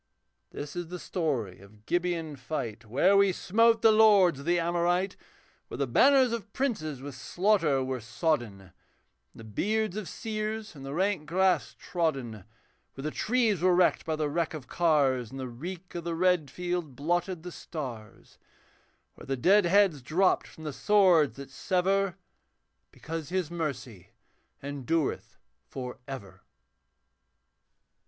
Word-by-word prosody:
This 145 +2 -7
is 175 -1 -4
the 180 +2 -6
story 140 - -2
of 105 +2 -18
Gibeon 175 -3 -1
fight 120 -5 -5
Where 145 - +3
we 200 -1 +5
smote 230 +6 +2
the 225 - +7
lords 205 -8 +5
of 140 - -9
the 175 0 +3
Amorite; 175 +3 0 0.5
Where - - -7
the 140 - 0
banners 260 - +5
of 225 -3 -5
princes 155 - -2
with 145 0 -7
slaughter 165 -1 +1
were 130 -1 -3
sodden. 115 - -1
And 95 -1 -17 0.6
the 115 - -11
beards 210 - -1
of 210 -4 -5
seers 215 -2 -4
in 140 - -11
the 135 +1 -6
rank 185 -4 0
grass 185 +3 +1
trodden; 135 - -2 0.5
Where 135 - -8
the 155 - -2
trees 225 -5 +1
were 180 0 +4
wrecked 180 0 +3
by 160 -1 -2
the 155 -1 -1
wreck 165 +2 -1
of 145 -5 -8
cars, 140 -8 +2
And 135 - -8
the 130 - -4
reek 175 +9 -8
of 175 - -5
the 170 0 -3
red 180 -4 +2
field 175 -5 -4
blotted 175 +4 -1
the 180 - -7
stars; 125 -12 -8 0.7
Where - - -14
the 135 0 -1
dead 195 +9 +4
heads 190 -6 +3
dropped 180 +9 +1
from 160 - -13
the 150 -2 -4
swords 185 -6 +4
that 140 -1 -9
sever, 190 +4 0 0.7
Because 160 -2 -6
His 180 -3 -2
mercy 130 - -5 0.6
endureth 145 +2 -2 0.3
for 125 -2 -7
ever. 100 -9 -8
165 Hz, 150 wpm, -28 LUFS, 135-185 Hz, 0.7 s, the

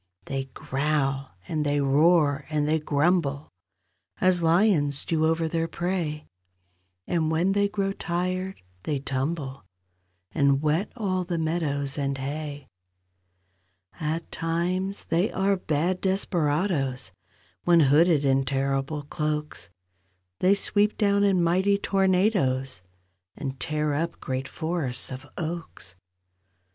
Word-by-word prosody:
They 135 -1 -3
growl, 135 - -1
and 155 -2 -1
they 145 0 +1
roar, 145 +1 +3
and 150 -1 0
they 160 +1 +2
grumble, 150 -1 +1 0.7
As 185 -1 +3
lions 165 -5 +2
do 160 -1 +1
over 165 0 +1
their 165 0 -1
prey, 170 -4 -2 0.8
And 160 -3 0
when 165 +4 +2
they 200 +1 +2
grow 200 -1 -1
tired 185 - -3 0.2
they 145 +8 -1
tumble 135 +1 -3 0.7
And 140 -1 +3
wet 155 +7 0
all 190 -6 -1
the 175 -1 -3
meadows 150 -4 -1
and 140 -1 -1
hay. 145 +1 -5 1.3
At 160 +2 -3
times 180 +4 -2
they 175 +5 +1
are 195 +1 +2
bad 175 +1 -1
desperadoes— 155 - 0 0.5
When 170 -1 +6
hooded 150 +1 +4
in 135 0 +3
terrible 135 +2 -1
cloaks— 150 -7 -3 0.7
They 190 +2 +4
sweep 205 +1 +1
down 200 -1 +3
in 190 -3 +3
mighty 190 +4 +3
tornadoes 185 - +1 0.5
And 135 -2 -5
tear 150 -1 -1
up 165 +3 -2
great 130 0 -3
forests 160 -6 -3
of 130 +3 -7
oaks. 160 - -6
155 Hz, 115 wpm, -26 LUFS, 140-180 Hz, 1.3 s, When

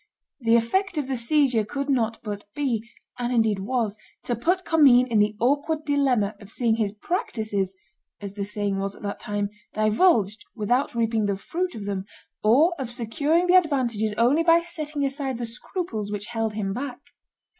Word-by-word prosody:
The 230 -2 +3
effect 345 - +1
of 290 -3 -1
the 270 - -1
seizure 250 -1 +2
could 275 +6 -4
not 230 -5 +1
but 205 -2 -5
be, 235 -6 -1 0.3
and 245 0 -1
indeed 220 -4 +2
was, 215 0 -1 0.2
to 240 - -1
put 360 - 0
Commynes 265 -6 +6
in 220 - +4
the 210 +1 +2
awkward 290 +5 +1
dilemma 260 -8 +2
of 200 - -12
seeing 230 -2 +1
his 210 -3 0
practices 215 - -2 0.4
(as 200 -1 -7
the 200 -1 -4
saying 205 -1 -2
was 195 0 -3
at - - -15
that 200 0 -4
time) 205 -2 -2 0.2
divulged 215 - +3
without 240 +4 0
reaping 225 -2 +1
the 200 -1 0
fruit 360 - -3
of 210 -3 -6
them, 195 -1 -3 0.4
or 280 +11 +5
of 260 -3 -3
securing 285 +9 +1
the 360 - +3
advantages 250 - +2
only 250 +7 +4
by 335 0 +5
setting 305 -4 -3
aside 270 -2 -2
the 240 - -3
scruples 230 - -5
which 205 0 -4
held 225 -1 -1
him 195 -2 -2
back. 255 +2 -5
235 Hz, 175 wpm, -25 LUFS, 210-285 Hz, 0.4 s, Commynes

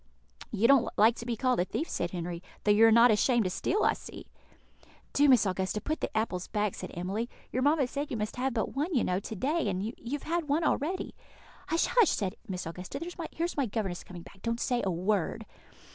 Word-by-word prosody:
"You 225 +4 +3
don't 275 -2 +5
like 220 +2 +5
to 235 - -7
be 235 - 0
called 250 +2 +1
a 175 - +2
thief," 315 - -3
said 175 - -2
Henry, 175 -1 -5 0.2
"though 210 - +4
you 220 +2 +7
are - - +5
not 235 +1 +7
ashamed 235 +2 +3
to 185 - -1
steal, 410 - 0
I - - +4
see." - - -10 0.9
"Do, 290 0 +5
Miss 250 -5 +6
Augusta, 190 +2 -1
put 310 +8 -3
the - - -1
apples 190 -5 -1
back," 210 -2 -1
said - - -7
Emily; 195 +7 -3 0.2
"your 255 - -1
mamma 290 +1 +3
said 280 +4 -4
you 240 - -3
must 215 +2 -3
have 265 +2 0
but 220 - -1
one, 305 +5 -1
you 245 - +3
know, 180 +1 0
to 220 - -7
day, 285 - 0
and 190 0 -2
you 225 - -4 0.2
have 290 - -3
had 335 -1 -1
one 305 +4 +2
already." 320 +5 -1 0.5
"Hush, 330 - +2
hush!" 475 -5 +4
said 195 0 -1
Miss 185 -3 -4
Augusta; 180 +10 -6 0.4
"here's 340 +2 -2
my 275 -3 +1
governess 195 -5 -3
coming 175 -2 -10
back. 195 - -16
Don't 230 0 -2
say 245 -1 0
a 195 - 0
word." 185 +1 -1
225 Hz, 225 wpm, -29 LUFS, 190-275 Hz, 0.9 s, you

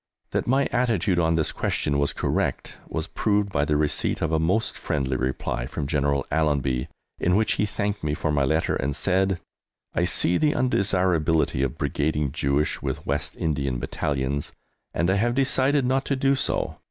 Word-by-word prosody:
That - - -1
my 135 +3 +3
attitude 105 -7 +1
on 80 -1 +2
this 80 -2 +1
question 70 -1 -1
was 70 -1 +2
correct - - -2
was - - -3
proved 105 -2 0
by 70 -4 +1
the 75 0 +1
receipt 75 -1 0
of 80 - 0
a 80 - +2
most 95 +8 +1
friendly 65 -3 -1
reply 65 -1 -2
from 75 - -4
General 70 -1 0
Allenby, 70 -5 +1 0.3
in 90 +1 +2
which 110 +1 +2
he 105 - 0
thanked 100 0 -2
me 75 0 0
for 75 - -1
my 70 -2 +2
letter 80 +5 +1
and 70 +1 -1
said: 95 0 +1 0.5
I 85 - +1
see 90 0 +2
the 150 -1 +3
undesirability 90 - +2
of 65 - -2
brigading 75 -1 0
Jewish 70 0 0
with - - -4
West 70 +2 -2
Indian 70 -5 -1
Battalions, 70 +2 -2 0.4
and 85 - 0
I 95 - +2
have 120 +4 +1
decided 135 +1 +2
not 130 +1 +1
to 140 - 0
do 135 +1 +2
so. 135 - -1
80 Hz, 175 wpm, -25 LUFS, 70-105 Hz, 0.5 s, my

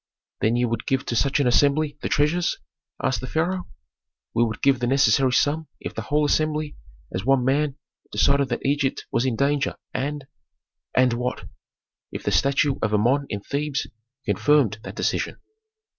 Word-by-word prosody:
"Then 110 +2 +2
ye 120 0 +2
would 115 -2 -3
give 135 -1 0
to 120 - -2
such 140 +4 +2
an 140 - +2
assembly 145 +4 +3
the - - -2
treasures?" 165 +4 +1 0.5
asked 130 - 0
the 130 - -5
pharaoh. 180 +6 -1 0.7
"We 120 - +3
would 110 -2 -3
give 135 -2 +4
the 120 - 0
necessary 135 0 +4
sum 150 +4 +1
if - - -6
the - - -4
whole 150 0 +1
assembly, 155 0 0 0.4
as 95 - -2
one 130 0 +3
man, 140 +1 +1 0.4
decided 140 -1 +2
that - - -3
Egypt 140 -1 0
was 120 +3 +1
in 125 - 0
danger, 140 +2 +1 0.2
and 145 +1 -3 0.3
" - - -41
"And 130 -1 +4
what?" 125 +1 -3 0.7
"If - - -6
the - - 0
statue 140 0 +2
of 105 0 +1
Amon 130 +7 +2
in 100 -2 -4
Thebes 145 +4 -2 0.4
confirmed 140 -8 +2
that - - -8
decision." - - -1
140 Hz, 175 wpm, -24 LUFS, 125-145 Hz, 0.7 s, give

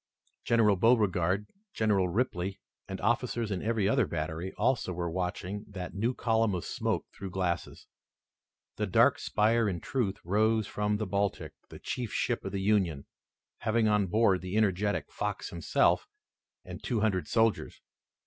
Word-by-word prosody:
General 110 -4 +4
Beauregard, 100 -3 +2 0.3
General 100 -4 +2
Ripley, 95 -2 -1 0.3
and 95 -1 -5
officers 120 -1 0
in 95 - -2
every 110 -3 +1
other 115 -1 +2
battery, 80 +3 -3
also 115 -4 0
were 85 -1 -3
watching 90 +3 -3
that 95 -3 -6
new 115 +6 -1
column 115 -3 +1
of 90 - -4
smoke - - -2
through 95 - -7
glasses. 90 -1 -3 0.9
The - - -1
dark - - +4
spire 110 +1 +2
in 90 -3 -3
truth 110 -2 -1
rose 110 +4 +2
from 105 +1 -1
the 110 - -2
Baltic, 100 0 -1 0.2
the - - -10
chief 120 -4 -4
ship - - -1
of 95 - -4
the 100 0 -2
Union, 95 -9 +1 0.5
having 110 0 +1
on 105 -2 +2
board 100 -1 +3
the 95 +3 -3
energetic 105 -1 +1
Fox - - -3
himself, - - +2 0.6
and - - -8
two 115 -5 -1
hundred 95 -7 +1
soldiers. 115 -1 +1
105 Hz, 150 wpm, -30 LUFS, 95-110 Hz, 0.9 s, General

